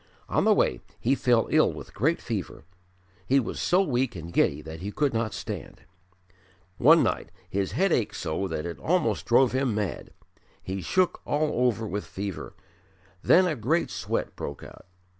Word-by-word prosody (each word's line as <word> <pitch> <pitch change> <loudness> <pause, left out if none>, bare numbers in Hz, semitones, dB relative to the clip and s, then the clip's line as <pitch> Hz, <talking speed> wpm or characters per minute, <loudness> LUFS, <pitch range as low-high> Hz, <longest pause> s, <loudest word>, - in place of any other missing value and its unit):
On - - +1
the - - +6
way - - +1 0.2
he 125 - +2
fell 120 -4 +2
ill - - +4
with - - -10
great - - +1
fever; - - -5 0.6
he 135 +5 +4
was 120 - -4
so 185 +2 +3
weak 125 - 0
and 85 0 -8
giddy 70 -3 +2
that 80 +1 -8
he 100 +4 -5
could 145 +2 0
not 115 -1 -1
stand. - - -7 1.0
One 160 +5 +7
night - - -1 0.2
his 95 -1 -1
head 195 0 +2
ached 115 - +1
so 85 +4 -2
that 80 -2 -4
it 85 -1 -6
almost 175 -1 0
drove 125 +1 +5
him 130 -4 0
mad; 105 -3 -3 0.5
he 95 0 -4
shook 185 - +1
all 145 -4 +1
over 115 -2 -1
with 105 -1 -4
fever; 100 -2 -6 0.7
then 185 +2 +5
a 165 -4 0
great 145 +9 0
sweat - - -3
broke 70 - -6
out. - - -13
115 Hz, 175 wpm, -27 LUFS, 95-145 Hz, 1.0 s, One